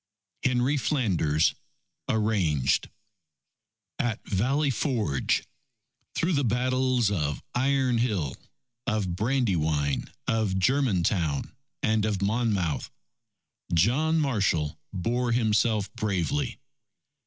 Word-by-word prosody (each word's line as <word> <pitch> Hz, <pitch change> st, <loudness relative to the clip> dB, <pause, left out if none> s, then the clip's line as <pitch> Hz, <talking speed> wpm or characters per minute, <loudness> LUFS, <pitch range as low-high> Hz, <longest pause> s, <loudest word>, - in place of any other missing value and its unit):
Henry 130 Hz, +3 st, +2 dB
Flanders 100 Hz, -, +1 dB, 0.6 s
(Arranged) 95 Hz, -, +1 dB, 1.1 s
AT 115 Hz, -3 st, 0 dB
VALLEY 135 Hz, +9 st, +1 dB
FORGE 110 Hz, -, 0 dB, 0.7 s
Through 175 Hz, +2 st, +1 dB
the 140 Hz, -2 st, +2 dB
battles 125 Hz, -1 st, +1 dB
of 75 Hz, -7 st, -1 dB
Iron 130 Hz, -1 st, +2 dB
Hill, 100 Hz, -, 0 dB, 0.5 s
of 105 Hz, -7 st, 0 dB
Brandywine, 85 Hz, -, 0 dB, 0.2 s
of 110 Hz, -4 st, +1 dB
Germantown, 95 Hz, -, +1 dB, 0.3 s
and 110 Hz, -1 st, +2 dB
of 105 Hz, -3 st, 0 dB
Monmouth, 100 Hz, -7 st, 0 dB, 0.9 s
John 140 Hz, -, +3 dB
Marshall 95 Hz, -, 0 dB
bore 120 Hz, +6 st, 0 dB
himself 110 Hz, -2 st, +1 dB
bravely. 110 Hz, -, -1 dB
110 Hz, 85 wpm, -27 LUFS, 90-125 Hz, 1.1 s, John